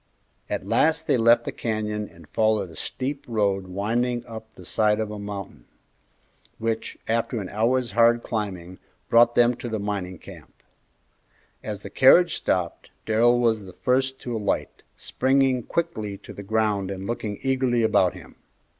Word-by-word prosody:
At - - -3
last 160 0 +2
they - - +2
left 115 +1 +4
the - - -3
canyon 105 -2 -3
and 85 -2 -17
followed 110 -3 +1
a - - -13
steep 140 +2 -4
road 100 -4 0
winding 120 +6 -1
up 110 -1 -9
the - - -13
side 105 0 +2
of 110 -1 -2
a 105 - -6
mountain, 100 -10 -7 0.9
which, 115 0 -3
after 115 +1 0
an 95 -3 -5
hour's 120 +3 +1
hard 115 +2 +4
climbing, 95 -5 -4 0.3
brought 120 0 +5
them 120 0 +5
to 120 -1 -6
the 110 - -2
mining 100 -3 -4
camp. - - -14 1.0
As 105 -2 -6
the - - -8
carriage 170 +6 +6
stopped 90 -2 -2 0.2
Darrell 120 +2 +3
was 110 -4 +1
the 95 - -11
first 130 +5 0
to 120 -2 -4
alight, 105 -2 -2
springing 130 -1 +1
quickly 110 -9 -3
to - - -12
the - - -8
ground 105 -2 0
and 95 0 -5
looking 105 -2 -3
eagerly 130 -3 +1
about 100 -5 +3
him. - - -13
110 Hz, 160 wpm, -24 LUFS, 100-120 Hz, 1.0 s, carriage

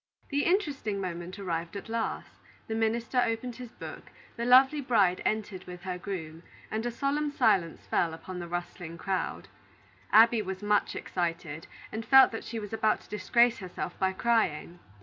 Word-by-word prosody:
The 285 0 0
interesting 290 - 0
moment 180 0 -5
arrived 170 -2 -3
at 200 - -8
last, 225 0 -3 0.4
the 220 - -3
minister 230 +3 +1
opened 230 +1 -2
his 250 -3 -8
book, - - -9 0.3
the 235 - -3
lovely 265 +4 +6
bride 205 -8 +3
entered 210 -4 -2
with 180 -1 -9
her 180 -1 -4
groom, 165 -4 -6 0.3
and 220 +1 -1
a - - -2
solemn 285 +4 0
silence 215 - +1
fell 170 - +1
upon 180 +3 -7
the 175 - -5
rustling 175 -1 -5
crowd. 190 +1 -2 0.6
Abby 225 +1 +7
was 190 -1 -5
much 205 0 +1
excited, 165 -3 -3 0.2
and 220 +1 -4
felt 265 +2 +7
that 225 - -5
she 230 - -5
was 210 -1 -6
about 220 -1 +1
to - - -19
disgrace 235 +4 +3
herself 180 -2 -5
by 190 0 +2
crying. 190 -6 0
210 Hz, 170 wpm, -29 LUFS, 180-235 Hz, 0.6 s, Abby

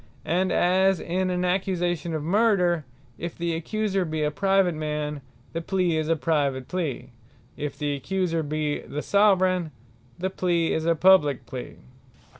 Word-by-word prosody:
As 185 +1 +2
in 185 +2 -1
an 180 0 0
Accusation 175 -3 -1
of 155 - -3
Murder, 180 -4 +2 0.3
if 170 0 -5
the 170 -1 -1
accuser 195 +4 -1
be 155 -2 -2
a 150 - +1
Private 195 +1 +2
man, 150 -1 -3 0.3
the 165 - -2
plea 180 -1 0
is 155 0 -1
a 165 - +3
Private 140 -5 0
plea; 145 -8 -3 0.4
if 145 -1 -5
the 145 0 -1
accuser 165 +4 -1
be 150 0 -2
the 150 - -6
Soveraign, 185 -4 +3 0.5
the 190 +2 -2
plea 170 -3 +1
is 160 - -1
a 170 - +3
Publique 155 -6 +4
plea. 125 -2 -7
170 Hz, 150 wpm, -25 LUFS, 150-185 Hz, 0.5 s, Publique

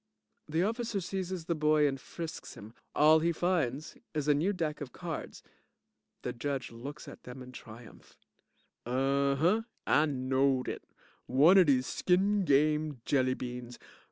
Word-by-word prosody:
(The 160 +3 +1
OFFICER 225 0 -1
seizes 185 -2 -4
the 170 - 0
boy 150 -1 +3
and 135 -2 -3
frisks 165 -2 -7
him. 105 +2 -11 0.2
All 155 +2 +6
he 170 +2 +1
finds 160 -5 -1 0.2
is 150 -1 -1
a 150 - +5
new 160 +8 +1
deck 160 -6 -3
of 135 -3 -6
cards. 170 -3 -6 0.8
The - - -3
JUDGE 135 +1 -3
looks 140 +6 -8
at - - -11
them 125 +1 -9
in 125 - -11
triumph.) 115 -1 -13 0.7
Unh 135 +3 +1
hunh! 185 +10 +2 0.2
I 150 +1 +4
knowed 130 -1 +1
it, - - -4 0.4
one 155 +10 +6
of 180 - +5
dese 130 -2 +3
skin 195 +5 +1
game 150 -2 +2
jelly 130 -2 +2
beans. 125 -1 -7
150 Hz, 155 wpm, -31 LUFS, 130-170 Hz, 0.8 s, All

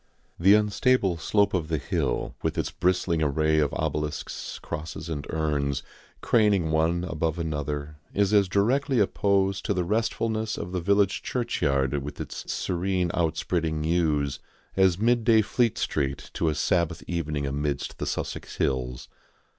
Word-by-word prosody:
The 95 +4 +7
unstable 105 -2 +2
slope 100 +4 +2
of 85 -5 0
the 80 0 0
hill, - - -1
with - - -2
its - - -1
bristling 90 -2 +1
array 75 +1 +2
of 75 -2 +2
obelisks, 75 -1 -3
crosses 80 0 -6
and 75 -3 -4
urns, 75 -4 -1 0.4
craning 100 -8 +3
one 80 +2 +2
above 80 0 -1
another, 75 -2 -3
is 100 0 +1
as 100 -2 +5
directly 130 +8 +2
opposed 100 -1 +1
to 100 - 0
the 90 - +1
restfulness 110 +2 -1
of 90 - -5
the 90 -1 -2
village 100 +2 +2
churchyard 70 - 0
with 70 +2 -7
its - - -6
serene 90 -1 -1
outspreading 80 -1 0
yews 75 -4 +1 0.4
as 95 -2 +4
midday 115 0 +4
Fleet 120 +1 +1
Street 70 0 -2
to 80 - +1
a 75 - -1
Sabbath 85 0 0
evening 75 -4 -2
amidst 70 +1 -2
the - - -2
Sussex - - -4
hills. 60 -2 -1
85 Hz, 145 wpm, -26 LUFS, 75-100 Hz, 0.4 s, The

